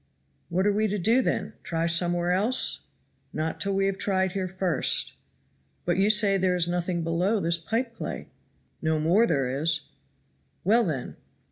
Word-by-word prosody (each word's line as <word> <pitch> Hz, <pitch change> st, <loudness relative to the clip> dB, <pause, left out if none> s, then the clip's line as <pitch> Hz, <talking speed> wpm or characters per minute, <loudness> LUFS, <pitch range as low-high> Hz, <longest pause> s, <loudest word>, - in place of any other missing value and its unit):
"What 185 Hz, +3 st, 0 dB
are 205 Hz, -, +3 dB
we 215 Hz, +1 st, +1 dB
to 210 Hz, 0 st, -2 dB
do, 225 Hz, +7 st, +3 dB
then? -, -, -2 dB
try 165 Hz, 0 st, -2 dB
somewhere 175 Hz, +1 st, +1 dB
else?" 215 Hz, +8 st, +2 dB, 0.5 s
"Not 160 Hz, +1 st, -3 dB
till 200 Hz, -1 st, 0 dB
we 195 Hz, 0 st, +1 dB
have 195 Hz, 0 st, -2 dB
tried 190 Hz, -2 st, 0 dB
here 190 Hz, 0 st, -3 dB
first." 180 Hz, -5 st, +1 dB, 0.7 s
"But 175 Hz, 0 st, 0 dB
you 200 Hz, +2 st, +3 dB
say 210 Hz, -2 st, +4 dB
there 185 Hz, -1 st, +1 dB
is 175 Hz, -1 st, +1 dB
nothing 175 Hz, -1 st, -2 dB
below 180 Hz, +6 st, 0 dB
this 170 Hz, -2 st, +1 dB
pipe 230 Hz, +8 st, -2 dB
clay." -, -, -6 dB, 0.5 s
"No 160 Hz, -1 st, 0 dB
more 180 Hz, +9 st, +3 dB
there 140 Hz, -5 st, 0 dB
is." 150 Hz, +4 st, +1 dB, 0.7 s
"Well, 225 Hz, +5 st, +3 dB
then." 140 Hz, -8 st, -4 dB
180 Hz, 165 wpm, -26 LUFS, 165-200 Hz, 0.7 s, say